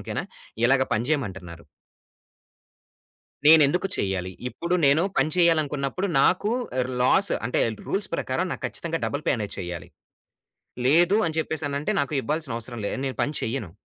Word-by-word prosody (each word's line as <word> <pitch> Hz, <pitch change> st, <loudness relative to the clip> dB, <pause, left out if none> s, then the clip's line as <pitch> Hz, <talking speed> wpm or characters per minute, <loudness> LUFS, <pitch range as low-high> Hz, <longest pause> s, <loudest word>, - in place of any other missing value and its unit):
ఓకేనా, -, -, -4 dB, 0.4 s
ఇలాగ 130 Hz, +1 st, +4 dB
పని 115 Hz, +3 st, -1 dB
చేయమంటున్నారు 95 Hz, -, -3 dB, 1.8 s
నేనెందుకు 160 Hz, +4 st, +6 dB
చెయ్యాలి, 95 Hz, -2 st, -2 dB, 0.2 s
ఇప్పుడు 170 Hz, +6 st, -3 dB
నేను 140 Hz, +4 st, +4 dB
పని 155 Hz, -, +2 dB
చేయాలనుకున్నప్పుడు 155 Hz, 0 st, +1 dB
నాకు 195 Hz, +7 st, +2 dB, 0.3 s
ఆహ్, 125 Hz, -, 0 dB
లాసు. 190 Hz, +10 st, +3 dB
అంటే, 125 Hz, -, 0 dB, 0.3 s
రూల్స్ 200 Hz, +1 st, -1 dB
ప్రకారం 150 Hz, +7 st, -1 dB
నాకు -, -, -7 dB
కచ్చితంగా 165 Hz, -1 st, -4 dB
డబుల్ 145 Hz, +2 st, -3 dB
పే -, -, +3 dB
అనేది 105 Hz, -2 st, -5 dB
చెయ్యాలి. 85 Hz, -1 st, -6 dB, 1.0 s
లేదు 175 Hz, +8 st, +5 dB
అని 160 Hz, 0 st, -3 dB
చెప్పేసనంటే, 150 Hz, -2 st, -2 dB
నాకు 140 Hz, +2 st, -2 dB
ఇవ్వాల్సిన 150 Hz, 0 st, -3 dB
అవసరం 120 Hz, +1 st, -4 dB
లేదు. -, -, -2 dB
నేను 130 Hz, -, -4 dB
పని 145 Hz, -, -1 dB
చేయ్యను. 110 Hz, -6 st, -3 dB
140 Hz, 140 wpm, -25 LUFS, 120-160 Hz, 1.8 s, నేనెందుకు